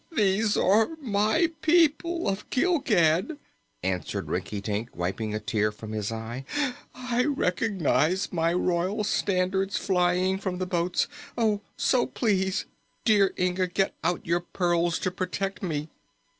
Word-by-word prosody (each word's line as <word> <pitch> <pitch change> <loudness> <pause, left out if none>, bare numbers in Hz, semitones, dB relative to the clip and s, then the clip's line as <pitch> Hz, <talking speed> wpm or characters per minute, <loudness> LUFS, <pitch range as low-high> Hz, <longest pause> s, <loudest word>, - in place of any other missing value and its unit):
"They 205 -7 +2 0.2
are 220 - +3
my 220 - +2
people 335 +1 +3
of 195 +1 -2
Gilgad!" 250 - +2 0.5
answered 90 -1 -2
Rinkitink, 105 +3 -3
wiping 95 +5 -2
a - - -1
tear 105 0 0
from 105 +1 -9
his 105 -1 -2
eye. 115 +3 -5 0.5
"I 250 -1 0
recognize 190 - +1
my 165 -1 +2
royal 180 +4 0
standards 190 0 0
flying 185 0 +1
from 185 -2 -3
the 185 - -2
boats. 175 0 0 0.8
So, 250 -2 +3
please, 195 -6 0 0.4
dear 205 -4 +4
Inga, 180 0 +1
get 190 +2 0
out 175 +2 0
your 170 +1 +2
pearls 175 -1 0
to 185 - -2
protect 195 +2 -3
me!" 155 -5 -3
185 Hz, 125 wpm, -27 LUFS, 165-210 Hz, 0.8 s, dear